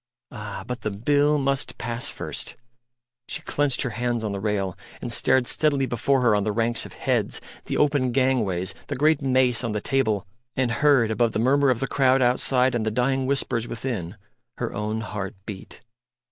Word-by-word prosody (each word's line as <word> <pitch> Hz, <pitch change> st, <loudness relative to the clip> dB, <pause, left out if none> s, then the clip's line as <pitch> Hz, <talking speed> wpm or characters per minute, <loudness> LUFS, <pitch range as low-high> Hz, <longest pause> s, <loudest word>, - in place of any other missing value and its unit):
Ah! 105 Hz, -5 st, -6 dB
but 125 Hz, -1 st, -5 dB
the -, -, -1 dB
Bill 145 Hz, +8 st, +2 dB
must 140 Hz, 0 st, -1 dB
pass 120 Hz, +1 st, -2 dB
first.... -, -, -4 dB, 0.7 s
She -, -, -2 dB
clenched 145 Hz, -3 st, +1 dB
her 125 Hz, -, -2 dB
hands 120 Hz, +1 st, -1 dB
on 105 Hz, -, -2 dB
the 100 Hz, -, -3 dB
rail, 100 Hz, -3 st, -1 dB, 0.2 s
and -, -, -4 dB
stared 130 Hz, -1 st, +3 dB
steadily 140 Hz, 0 st, +1 dB
before 130 Hz, +2 st, +1 dB
her 120 Hz, -4 st, +4 dB
on 105 Hz, -, +1 dB
the 105 Hz, -, 0 dB
ranks 115 Hz, +2 st, -1 dB
of -, -, -15 dB
heads, -, -, -1 dB, 0.3 s
the -, -, -2 dB
open 140 Hz, -4 st, +2 dB
gangways, 115 Hz, -9 st, +1 dB
the -, -, -3 dB
great 150 Hz, +2 st, +3 dB
mace 130 Hz, -2 st, +2 dB
on 115 Hz, -3 st, -2 dB
the 105 Hz, -, -1 dB
table, 110 Hz, -5 st, 0 dB, 0.3 s
and 130 Hz, -2 st, +1 dB
heard, 120 Hz, -3 st, +3 dB
above 115 Hz, 0 st, +1 dB
the -, -, 0 dB
murmur 135 Hz, +4 st, +3 dB
of 125 Hz, -3 st, +1 dB
the 135 Hz, -, 0 dB
crowd 135 Hz, -1 st, +3 dB
outside 125 Hz, +1 st, +3 dB
and 120 Hz, -2 st, 0 dB
the 110 Hz, -, 0 dB
dying 130 Hz, +3 st, 0 dB
whispers 130 Hz, -4 st, -1 dB
within, 110 Hz, -7 st, -4 dB, 0.4 s
her -, -, -3 dB
own 105 Hz, +2 st, -2 dB
heart 105 Hz, -2 st, -5 dB
beat. 100 Hz, -4 st, -9 dB
120 Hz, 190 wpm, -24 LUFS, 110-135 Hz, 0.7 s, her